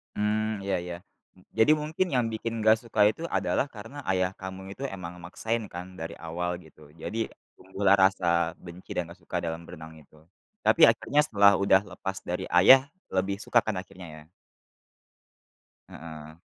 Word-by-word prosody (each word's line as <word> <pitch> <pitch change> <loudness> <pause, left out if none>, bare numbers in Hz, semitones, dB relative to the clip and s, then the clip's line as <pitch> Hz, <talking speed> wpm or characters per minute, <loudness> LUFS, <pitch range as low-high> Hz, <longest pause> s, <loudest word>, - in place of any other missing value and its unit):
Mmm 105 0 -1
iya 100 0 0
iya. 90 -1 -5 0.4
M - - -19 0.2
jadi 110 +7 +5
mungkin 160 +5 -1
yang 125 -2 +2
bikin 115 +1 -3
gak 110 0 +6
suka 115 -2 -6
itu 110 - -6 0.2
adalah - - 0
karena 115 +7 -10
ayah 95 0 +1
kamu 95 0 -7
itu 135 - -9
emang 90 -2 -7
maksain 110 +6 -3
kan 90 +1 -5
dari 80 0 -6
awal 85 +2 -3
gitu, 75 -1 -17
jadi 115 - -5 0.4
tumbuh 95 +2 -10
lah 100 - +8
rasa 95 -1 0 0.4
benci 85 +1 -12
dan 85 -2 -2
gak 90 - -14
suka 90 - -4
dalam 80 0 -4
berenang 80 -2 -10
itu. 75 +1 -22 0.5
Tapi 165 - +4
akhirnya 140 +5 +2
setelah 100 -6 +5
udah 95 0 +5
lepas 95 0 -5
dari 90 - -3
ayah 130 +9 +7 0.2
lebih 95 +1 0
suka 120 +2 +2
kan 110 - -1
akhirnya 95 -2 -12 0.2
ya? - - -27 1.6
Heeh. 80 -1 -10
95 Hz, 165 wpm, -27 LUFS, 90-110 Hz, 1.6 s, lah